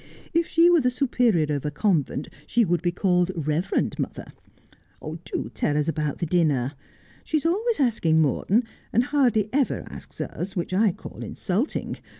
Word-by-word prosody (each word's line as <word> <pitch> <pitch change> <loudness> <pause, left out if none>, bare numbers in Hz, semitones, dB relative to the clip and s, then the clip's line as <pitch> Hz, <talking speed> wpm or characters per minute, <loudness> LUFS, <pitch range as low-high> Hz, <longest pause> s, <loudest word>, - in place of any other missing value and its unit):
If 335 0 +2
she 335 +1 +5
were 350 -2 +5
the 250 - +3
superior 240 - +1
of 140 - -4
a 150 - -1
convent 155 -6 0 0.2
she 235 -1 +3
would 175 -2 +1
be 175 0 +1
called 180 0 +1
Reverend 155 +2 -1
Mother. - - -5 0.7
Do 160 +2 -5
tell 145 - 0
us 150 - 0
about 150 -3 -1
the 170 - -2
dinner. 150 -6 +1 0.5
She 315 - 0
is 305 - -3
always 430 +6 +1
asking 210 - +2
Morton, 175 - +2 0.3
and 235 - +3
hardly 245 -7 +2
ever 275 -1 +1
asks - - -11
us, 190 +3 -4
which 175 0 -3
I 205 +1 +4
call - - -10
insulting. 210 - -2
185 Hz, 165 wpm, -25 LUFS, 160-250 Hz, 0.7 s, she